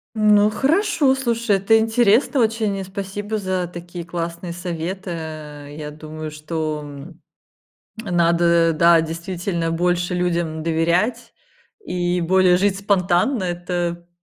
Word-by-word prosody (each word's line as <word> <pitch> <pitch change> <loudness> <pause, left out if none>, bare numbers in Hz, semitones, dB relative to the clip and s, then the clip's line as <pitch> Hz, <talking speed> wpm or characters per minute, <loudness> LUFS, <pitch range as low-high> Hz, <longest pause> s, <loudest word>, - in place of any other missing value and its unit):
Ну 210 -1 +5
хорошо, 280 - +2
слушай, 235 -5 0
это 200 +4 +4
интересно 225 +4 +3
очень. 220 -2 0
И 195 - -4
спасибо 200 +3 -4
за 185 -2 -2
такие 175 0 -7
классные 170 +1 -5
советы, 175 +2 -5
э, 150 -3 -7
я 150 -1 -6
думаю, 155 0 -8
что, 155 0 -4
м, 145 +4 -11 0.8
надо 170 -2 +3
да 170 +1 +5
действительно 170 +1 -3
больше 175 +1 0
людям 170 -3 -1
доверять, 170 +9 0 0.5
и 180 0 -1
более 180 +1 +4
жить 195 +1 +1
спонтанно. 195 +3 +1
Это 175 -1 -3
175 Hz, 120 wpm, -21 LUFS, 165-200 Hz, 0.8 s, Ну